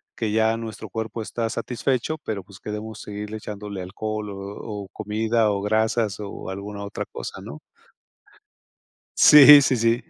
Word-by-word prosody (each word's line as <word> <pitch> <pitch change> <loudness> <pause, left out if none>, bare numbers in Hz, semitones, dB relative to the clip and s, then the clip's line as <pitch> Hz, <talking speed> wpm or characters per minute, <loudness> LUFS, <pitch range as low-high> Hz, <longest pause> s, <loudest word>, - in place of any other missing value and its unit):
que 110 -2 -2
ya 110 +1 +2
nuestro 110 -1 -7
cuerpo 110 +2 -4
está 115 +1 -3
satisfecho, 130 +5 -2
pero, 105 -3 -3
pues, 100 +2 -15
queremos 105 +1 -6
seguirle 105 +1 -6
echándole 105 -2 -7
alcohol, 105 +3 -5
o 100 - -7 0.5
o, - - -15
comida, 110 +2 0
o, 100 -1 -2
grasas, 110 0 0
o, 100 -2 -7
alguna 100 +1 -6
otra 100 - -5
cosa, - - -8
¿no? 75 - -9 1.6
Sí, 145 0 +10
sí, 130 -2 +2
sí. 115 +2 +1
110 Hz, 150 wpm, -23 LUFS, 105-115 Hz, 1.6 s, Sí